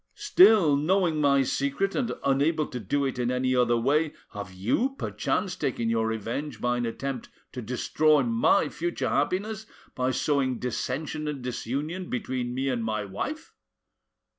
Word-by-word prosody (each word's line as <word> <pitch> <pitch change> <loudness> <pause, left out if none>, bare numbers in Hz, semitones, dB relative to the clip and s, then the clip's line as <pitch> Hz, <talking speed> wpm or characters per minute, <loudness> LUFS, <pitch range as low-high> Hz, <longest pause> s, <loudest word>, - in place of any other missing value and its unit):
Still, 210 - +6
knowing 165 +1 +1
my 140 -1 +4
secret 140 +9 -1
and 245 -3 -1
unable 145 +3 +2
to 125 - -6
do 140 +7 0
it 130 -2 -3
in 120 0 0
any 130 0 +1
other 120 -1 +3
way, 145 +6 +1 0.2
have 100 -2 -6
you 120 - 0
perchance 185 -3 -2
taken 120 -8 -1
your 115 -1 +1
revenge 115 +4 -4
by 120 0 0
an 120 -1 -1
attempt 130 +2 -4 0.2
to 125 - -6
destroy 140 +5 +2
my 115 -1 +3
future 175 +1 -2
happiness 210 +9 -1 0.3
by 130 0 0
sowing 130 -2 0
dissension 135 +5 -3
and 145 -4 -4
disunion 145 +9 -4
between 125 0 -3
me 135 +1 -1
and 125 -3 -1
my 110 -2 -2
wife?" 295 - -5
135 Hz, 155 wpm, -27 LUFS, 120-155 Hz, 0.3 s, Still